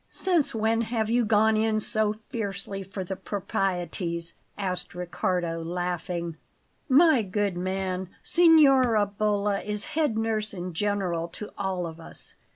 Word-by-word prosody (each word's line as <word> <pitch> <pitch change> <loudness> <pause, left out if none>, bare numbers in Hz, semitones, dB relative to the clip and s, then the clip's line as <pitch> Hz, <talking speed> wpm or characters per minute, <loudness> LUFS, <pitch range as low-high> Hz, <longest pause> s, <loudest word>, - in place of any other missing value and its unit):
"Since 345 -10 +1
when 225 +1 +1
have 225 -1 -1
you 240 +1 +3
gone 220 +1 +4
in 215 0 +2
so 215 0 0
fiercely 200 -4 -4
for 195 0 -6
the 190 +1 -4
proprieties?" 180 -3 -3 0.2
asked 185 -3 -3
Riccardo, 175 -1 -2
laughing. 175 -1 -3 0.5
"My 285 -1 +6
good 200 -1 -1
man, 185 0 -2
Signora 275 -10 +5
Bolla 205 0 0
is 210 0 -2
head 295 -8 +1
nurse 215 -2 -1
in 180 0 -5
general 180 -3 -1
to 210 +5 -8
all 190 -3 -2
of 165 0 -8
us. 165 - -10
200 Hz, 135 wpm, -26 LUFS, 180-220 Hz, 0.5 s, My